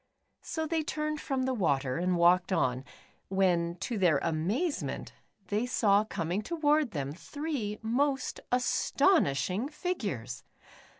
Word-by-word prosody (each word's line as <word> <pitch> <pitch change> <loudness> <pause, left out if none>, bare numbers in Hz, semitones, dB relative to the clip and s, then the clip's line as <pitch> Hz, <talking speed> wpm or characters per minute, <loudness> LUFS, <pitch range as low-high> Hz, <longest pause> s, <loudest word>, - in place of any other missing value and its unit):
So 320 -1 -3
they 320 0 0
turned 305 0 -3
from 270 -2 -1
the 260 0 0
water, 140 - 0
and 180 +1 +1
walked 175 +2 +4
on,, 130 -8 +1 0.4
when 175 -3 +1
to 220 +2 -2
their 175 -6 +4
amazement, 195 - -1 0.4
they 215 +4 0
saw 210 -4 +3
coming 180 -1 -2
toward, 305 0 +1
them, 140 -7 -3
three 265 - -4
most 270 +4 0
astonishing 245 - +2
figures 200 - -4
210 Hz, 120 wpm, -30 LUFS, 170-290 Hz, 0.4 s, walked